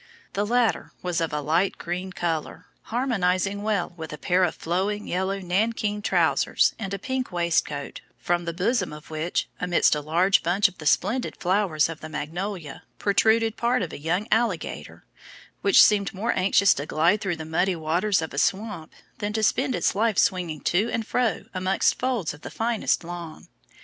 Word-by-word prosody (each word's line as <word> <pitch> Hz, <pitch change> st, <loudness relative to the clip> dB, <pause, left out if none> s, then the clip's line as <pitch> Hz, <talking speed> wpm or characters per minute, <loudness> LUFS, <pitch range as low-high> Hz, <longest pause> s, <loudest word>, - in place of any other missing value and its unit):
The 205 Hz, +1 st, -1 dB
latter 240 Hz, -1 st, +1 dB
was 175 Hz, -2 st, -1 dB
of 165 Hz, -, -1 dB
a 150 Hz, 0 st, -2 dB
light 165 Hz, +6 st, +1 dB
green 180 Hz, +2 st, -4 dB
colour, 165 Hz, -4 st, -3 dB, 0.2 s
harmonising 200 Hz, -5 st, 0 dB
well 205 Hz, -5 st, -1 dB
with 160 Hz, -2 st, -7 dB
a 150 Hz, -, -6 dB
pair 180 Hz, +5 st, +2 dB
of 175 Hz, -, +1 dB
flowing 195 Hz, +5 st, -2 dB
yellow 190 Hz, +2 st, -1 dB
nankeen 210 Hz, +3 st, -1 dB
trousers, 205 Hz, -, +2 dB
and 195 Hz, -3 st, -4 dB
a 200 Hz, -, -2 dB
pink 260 Hz, +4 st, -3 dB
waistcoat, 165 Hz, -5 st, -1 dB, 0.2 s
from 175 Hz, 0 st, -1 dB
the 170 Hz, -, -2 dB
bosom 185 Hz, +1 st, 0 dB
of 150 Hz, +1 st, -12 dB
which, 160 Hz, +3 st, -1 dB
amidst 180 Hz, -1 st, +3 dB
a 150 Hz, -, -1 dB
large 175 Hz, +6 st, +3 dB
bunch 180 Hz, +4 st, +3 dB
of 190 Hz, -, -13 dB
the 150 Hz, -, -4 dB
splendid 230 Hz, -, +1 dB
flowers 180 Hz, -4 st, +1 dB
of 165 Hz, -1 st, -7 dB
the 155 Hz, -, -8 dB
magnolia, 160 Hz, +1 st, -5 dB, 0.2 s
protruded 220 Hz, +2 st, +2 dB
part 240 Hz, -2 st, +1 dB
of 170 Hz, -, -5 dB
a -, -, -7 dB
young 175 Hz, +8 st, -1 dB
alligator, 220 Hz, -6 st, -1 dB, 0.6 s
which 395 Hz, -, +7 dB
seemed 200 Hz, -2 st, +2 dB
more 225 Hz, +5 st, 0 dB
anxious 195 Hz, +1 st, +4 dB
to 145 Hz, -, -5 dB
glide 170 Hz, +7 st, +2 dB
through 185 Hz, -3 st, -1 dB
the 160 Hz, -, -6 dB
muddy 175 Hz, +4 st, +1 dB
waters 170 Hz, +3 st, +1 dB
of 160 Hz, -, -6 dB
a 140 Hz, -, -1 dB
swamp 195 Hz, -4 st, -1 dB, 0.3 s
than 210 Hz, -1 st, -2 dB
to 220 Hz, 0 st, -1 dB
spend 260 Hz, +5 st, +2 dB
its 175 Hz, -, +1 dB
life 220 Hz, +1 st, +1 dB
swinging 175 Hz, -5 st, +1 dB
to 205 Hz, +7 st, +1 dB
and 225 Hz, -, -2 dB
fro 240 Hz, -1 st, 0 dB
amongst 185 Hz, 0 st, +1 dB
folds 240 Hz, -, -1 dB
of 145 Hz, -, -14 dB
the -, -, -7 dB
finest 225 Hz, -5 st, 0 dB
lawn. 170 Hz, -2 st, -8 dB
185 Hz, 180 wpm, -25 LUFS, 165-210 Hz, 0.6 s, which